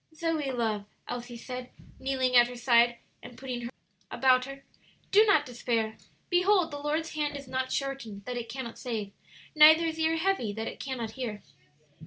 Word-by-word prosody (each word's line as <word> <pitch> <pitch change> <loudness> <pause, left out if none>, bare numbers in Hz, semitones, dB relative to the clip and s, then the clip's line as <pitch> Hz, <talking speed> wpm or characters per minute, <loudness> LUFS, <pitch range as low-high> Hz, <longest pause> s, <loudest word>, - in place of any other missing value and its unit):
"Zoe, 315 -3 -1
love," 220 -5 -1 0.2
Elsie 240 0 -6
said, 250 +1 -7 0.3
kneeling 260 -1 0
at 240 0 +8
her 245 - -8
side 240 -1 +4 0.2
and 245 -1 -12
putting 255 -2 -5
her 235 - -5
arms - - -27
about 255 -1 +4
her, 275 0 -9 0.5
"do 425 +2 +6
not 310 -8 +4
despair. 230 -3 -2 0.4
'Behold, 360 -1 +3
the 290 - -5
Lord's 305 +3 -2
hand 295 -2 -2
is 275 -2 -10
not 260 0 -2
shortened 235 -8 -4
that 250 - -4
it 235 -1 -5
cannot 235 -2 -6
save; 220 -5 -4 0.4
neither 315 +1 +8
His 325 0 -3
ear 320 0 +2
heavy 325 - 0
that 220 +2 -4
it - - -7
cannot 245 -5 -4
hear.'" 220 -4 -5
255 Hz, 180 wpm, -29 LUFS, 235-300 Hz, 0.5 s, at